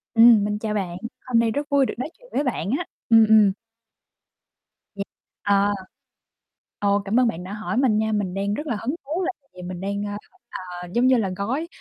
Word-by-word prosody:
ừm, 230 -2 +8
mình 210 0 -2
chào 215 -1 -2
bạn. 185 -4 -2 0.3
Hôm 245 -2 +2
nay 230 -1 +2
rất 285 +4 -3
vui 280 -2 +4
được - - -3
nói 260 - -3
chuyện - - -19
với 285 - +1
bạn 230 - -2
á. 350 - -3 0.2
Ừm, 225 -1 +7
ừm. 215 -3 +6 1.4
Ừm, 200 - -3 0.4
à. 200 0 +3 1.1
Ồ, 200 0 +2
cảm 215 +5 +2
ơn 250 - +4
bạn 180 -6 -3
đã 190 - -7
hỏi 215 +1 -3
mình 250 -5 +3
nha. 220 0 +1
Mình 205 -4 -1
đang 200 +1 -1
rất 295 +7 -4
là 240 - -1
hứng 265 +7 -1
thú 325 +7 -2
là 365 - 0
tại 275 - -38
vì 180 - -9
mình 180 0 -6
đang, 200 +1 -2
ơ, 205 0 -4 0.6
ờ, 180 - -7
giống 245 +2 +3
như 260 -1 +5
là 205 -5 0
gói 255 +11 -2
220 Hz, 220 wpm, -23 LUFS, 200-255 Hz, 1.4 s, ừm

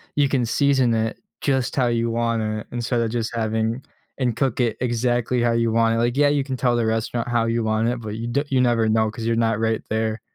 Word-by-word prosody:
you 145 -1 +3
can 125 -4 +1
season 130 -1 +2
it 110 0 -1 0.2
just 130 -3 0
how 125 -3 +2
you 115 0 0
want 115 0 0
it 110 0 -3
instead 120 0 -1
of 115 -1 -1
just 115 -1 -2
having 110 +2 -1 0.4
and 120 -4 -1
cook 130 -1 0
it 115 -2 0
exactly 120 0 0
how 120 0 +2
you 115 -1 +1
want 115 0 +3
it. - - -1
Like, 120 +2 +1
yeah, 145 0 +5
you 145 -1 +1
can 135 -1 -4
tell 125 -1 +1
the 115 - +1
restaurant 115 +2 -1
how 120 -1 +1
you 115 0 0
want 110 +2 +1
it, 120 -1 -3
but 105 -1 -5
you 115 +1 -4
d 140 +5 0
you 130 -2 +2
never 115 -3 +2
know 110 0 +2
'cause 115 0 -6
you're 115 0 +1
not 115 -1 +1
right 110 -1 0
there. 110 0 -1
115 Hz, 250 wpm, -22 LUFS, 115-125 Hz, 0.4 s, yeah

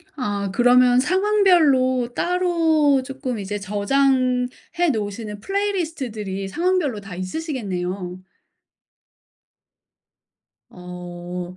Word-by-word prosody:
아 205 -7 -2
그러면 245 +1 +5
상황별로 315 - +3
따로 330 -6 +2
쪼끔 265 -4 -5
이제 205 +1 -4
저장해 255 - 0
놓으시는 210 -1 -4
플레이리스트들이 280 - -3
상황별로 335 - 0
다 195 -2 -9
있으시겠네요. 185 - -4 2.5
어. 180 0 -8
250 Hz, 215 characters per minute, -22 LUFS, 200-315 Hz, 2.5 s, 그러면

